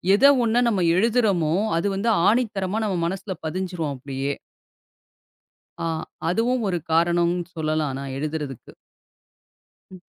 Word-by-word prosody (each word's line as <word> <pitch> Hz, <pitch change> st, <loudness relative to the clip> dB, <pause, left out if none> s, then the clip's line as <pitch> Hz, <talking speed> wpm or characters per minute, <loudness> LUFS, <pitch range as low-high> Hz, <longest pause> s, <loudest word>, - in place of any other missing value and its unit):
எத 255 Hz, -, +4 dB, 0.2 s
ஒண்ண 230 Hz, 0 st, +1 dB
நம்ம 200 Hz, -5 st, 0 dB, 0.2 s
எழுதுறோமோ, 205 Hz, -7 st, +2 dB, 0.2 s
அது 170 Hz, -, 0 dB
வந்து 205 Hz, +4 st, 0 dB, 0.2 s
ஆணித்தரமா 210 Hz, -4 st, 0 dB
நம்ம 195 Hz, -4 st, -1 dB
மனசுல 190 Hz, +2 st, -4 dB
பதிஞ்சிரும் 175 Hz, -3 st, -3 dB
அப்படியே. 135 Hz, +1 st, -3 dB, 1.5 s
அ, -, -, -2 dB, 0.4 s
அதுவும் 230 Hz, +6 st, +1 dB
ஒரு 180 Hz, -2 st, 0 dB
காரணம்னு 170 Hz, +1 st, +2 dB
சொல்லலாம். 155 Hz, -3 st, -1 dB
நான் 135 Hz, -1 st, -5 dB
எழுதுறதுக்கு. 150 Hz, -3 st, -5 dB, 1.2 s
ம். 185 Hz, -1 st, -12 dB
175 Hz, 110 wpm, -23 LUFS, 155-205 Hz, 1.5 s, எத